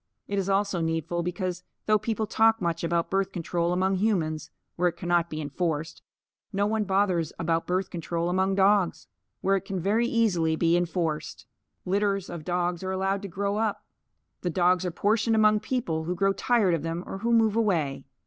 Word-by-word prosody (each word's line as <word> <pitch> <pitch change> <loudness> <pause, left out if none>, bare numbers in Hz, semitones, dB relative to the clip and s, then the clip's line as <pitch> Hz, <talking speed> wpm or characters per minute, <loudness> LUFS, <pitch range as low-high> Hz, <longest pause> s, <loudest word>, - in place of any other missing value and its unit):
It 200 0 -1
is 195 0 -2
also 195 -2 +1
needful 165 +1 -1
because 180 0 -3 0.2
though 215 0 +3
people 220 0 -1
talk 225 +1 +3
much 170 -2 -2
about 170 0 0
birth 195 0 +1
control 170 -1 -1
among 190 +1 +1
humans 160 -7 0 0.3
(where 180 0 +2
it - - -10
cannot 175 -1 +1
be 155 - -5
enforced) 155 +1 -3 0.5
no 200 -1 +1
one 215 0 0
bothers 190 -5 +1
about 165 0 -1
birth 185 +1 -1
control 170 0 -2
among 190 +2 +1
dogs 195 -2 +2 0.3
where 195 +1 +2
it 195 - -1
can 195 -1 -3
very 215 +7 +1
easily 180 -10 +2
be 165 +1 +2
enforced. 165 -3 -2 0.4
Litters 195 0 0
of 170 -3 -6
dogs 175 0 -1
are 185 - -3
allowed 195 +1 0
to 200 - -5
grow 200 +3 -2
up. 220 -1 -1 0.6
The 180 - -1
dogs 180 +2 +2
are - - 0
portioned 220 +6 +1
among 215 -1 +4
people 205 -10 -2
who 180 +2 -2
grow 195 +2 +2
tired 210 -3 +2
of 165 - 0
them 165 +2 -3
or 195 - -6
who 230 +3 -1
move 225 -2 +4
away. 160 -12 0
185 Hz, 185 wpm, -27 LUFS, 170-200 Hz, 0.6 s, among